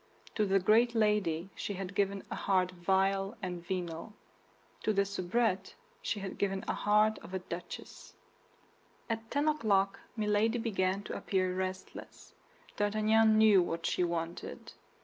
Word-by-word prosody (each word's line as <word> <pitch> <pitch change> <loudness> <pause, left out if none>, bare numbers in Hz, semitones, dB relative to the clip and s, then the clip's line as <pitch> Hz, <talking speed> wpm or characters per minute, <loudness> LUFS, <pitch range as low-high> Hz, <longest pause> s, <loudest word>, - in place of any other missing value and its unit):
To 210 -2 +1
the 195 0 +3
great 230 +5 +4
lady 195 -5 +1
she 205 - -4
had 190 0 -5
given 195 0 0
a - - -2
heart 185 -2 +1
vile 195 +3 +1
and 180 -4 -5
venal; 175 +1 -4 0.7
to 215 - +1
the 200 0 +2
soubrette 195 0 -1 0.3
she 205 - -2
had 195 -1 -6
given 195 -1 0
the - - -2
heart 210 +1 +3
of 190 - -8
a - - +2
duchess. 175 -1 -8 1.0
At 225 0 -4
ten 290 +2 0
o'clock 200 -10 +2 0.2
Milady 215 +2 +2
began 200 -4 0
to - - -6
appear 185 -2 0
restless. 185 0 -6 0.4
D'Artagnan 215 +1 +3
knew 215 -3 +7
what 170 -1 -3
she 180 - +1
wanted. 170 0 -4
195 Hz, 145 wpm, -32 LUFS, 185-215 Hz, 1.0 s, knew